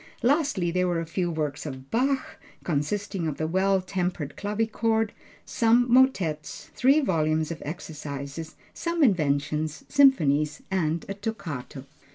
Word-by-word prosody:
Lastly 260 - +2
there 180 +1 +1
were 175 -2 0
a 165 - -3
few 175 +2 -1
works 150 -3 -2
of 130 -2 -8
Bach, 265 +3 0 0.2
consisting 175 +4 -1
of 150 - -3
the 155 - -1
Well 190 +3 +2
tempered 180 -5 -3
Clavichord, 220 +1 0 0.3
some 235 +1 +3
motets, 190 - +2
three 275 +4 +4
volumes 155 - +1
of 165 - -6
exercises, 150 -1 -6 0.2
some 335 -1 0
inventions, 155 - +1
symphonies 155 - +3
and 165 -3 0
a 195 - -3
toccato. 160 - -6
175 Hz, 130 wpm, -26 LUFS, 155-220 Hz, 0.3 s, three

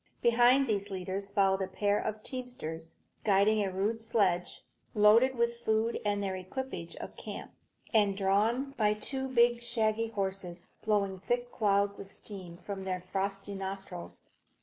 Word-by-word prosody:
Behind 245 +3 +5
these 205 -4 -1
leaders 190 +1 -4
followed 195 -1 +2
a 190 - -1
pair 205 +2 +1
of 215 0 -4
teamsters, 165 -11 -5 0.3
guiding 210 +1 +4
a 195 - -1
rude 205 +5 -1
sledge, 195 -6 +1 0.3
loaded 225 +5 +6
with 235 0 +1
food 225 0 +1
and 205 -1 0
the 190 -1 -1
equipage 185 -2 -5
of - - -8
the - - -11
camp, - - -7 0.4
and 205 -3 +4
drawn 215 +8 +2
by 210 -6 +2
two 265 +5 -3
big, 240 -2 +4
shaggy 225 -1 0
horses, 190 -4 -4 0.2
blowing 200 -3 +1
thick 245 +5 -1
clouds 200 -1 +1
of 195 - -8
steam 185 -5 -7
from 195 +1 -6
their 185 -1 -2
frosty 195 +2 -3
nostrils. 190 - -6
205 Hz, 150 wpm, -31 LUFS, 195-230 Hz, 0.4 s, loaded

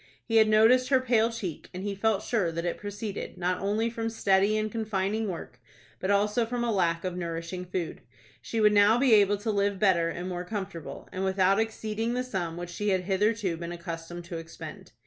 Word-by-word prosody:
He 225 -1 +2
had 220 -1 +6
noticed 235 +4 +5
her 265 -2 +5
pale 235 -3 +2
cheek, 200 -9 -6
and 185 - -5
he 205 0 -2
felt 205 +1 +1
sure 200 -8 0
that 170 +1 -3
it 175 - -2
proceeded, 205 0 -5
not 180 0 -1
only 210 +3 +1
from 230 -1 -3
steady 205 -1 +2
and 215 0 -1
confining 215 -1 -1
work, 145 -8 -7 0.4
but 185 - -2
also 210 +3 +2
from 240 +1 -2
a 235 - +1
lack 170 -5 +1
of 185 -1 -3
nourishing 170 +1 -4
food. 180 -2 -4 0.4
She 230 - -3
would 210 -1 +5
now 205 +2 +6
be 255 -2 +4
able 205 -1 +5
to 215 +2 -2
live 200 -1 +1
better 185 -5 +3
and 175 +2 -5
more 180 -1 -3
comfortable, 180 -8 -6
and 185 - -3
without 190 +1 +3
exceeding 225 +1 -2
the 250 - 0
sum 180 -9 -3
which 175 0 -6
she 210 +4 -2
had 190 -2 +2
hitherto 195 -1 0
been 170 0 -5
accustomed 170 0 -6
to 170 -1 -5
expend. 165 0 -10
200 Hz, 205 wpm, -28 LUFS, 175-220 Hz, 0.4 s, had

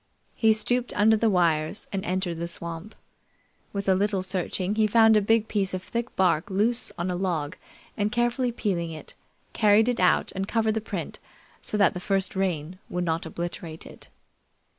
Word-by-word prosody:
He 220 -1 +4
stooped 245 +3 -1
under 220 +2 +5
the 220 +1 +2
wires 170 0 +1
and 195 -1 -2
entered 180 -2 -2
the 170 - -2
swamp. 170 +4 -7 0.8
With 200 -1 -4
a 190 - +5
little 195 0 +1
searching, 185 +1 -2
he 215 0 +3
found 225 0 +5
a 210 - +5
big 225 +1 +2
piece 195 -3 -1
of 185 - -5
thick 235 +4 -4
bark 180 +1 +2
loose 220 +5 0
on 175 +2 -2
a - - -2
log 170 -5 -2 0.4
and 205 0 0
carefully 240 +1 +1
peeling 185 -7 -2
it, 160 -1 -9 0.4
carried 215 +1 +4
it 245 -1 0
out 180 - +3
and 195 0 -3
covered 220 -1 +1
the 220 - -2
print 220 - -5 0.4
so 210 - -2
that 200 -4 +4
the 180 - -5
first 195 +1 -1
rain 180 -2 -2
would 180 0 -2
not 165 0 -1
obliterate 170 -1 -6
it. - - -13
195 Hz, 185 wpm, -26 LUFS, 175-220 Hz, 0.8 s, under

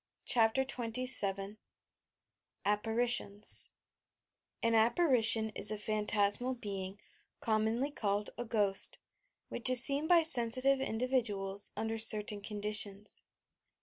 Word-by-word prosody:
CHAPTER 230 +2 +2
XXVn 225 -6 -1 1.1
APPARITIONS 210 0 +2 0.9
I - - +1
An 230 - 0
apparition 225 -2 +2
is 210 -1 -3
a 215 - -3
pbaiitasma] 215 +3 -2
being, 195 -2 -7 0.4
commonly 225 +5 -2
called 205 -5 -4
a - - -6
"ghost," 205 -4 +1 0.5
which 240 - -3
is 255 -1 +5
seen 285 +3 +2
by 340 -1 +3
sensitive 265 -1 +2
individuals 220 -6 -3
under 225 0 -4
certain 210 -1 +5
conditions. 210 -1 -4
220 Hz, 100 wpm, -31 LUFS, 205-250 Hz, 1.1 s, is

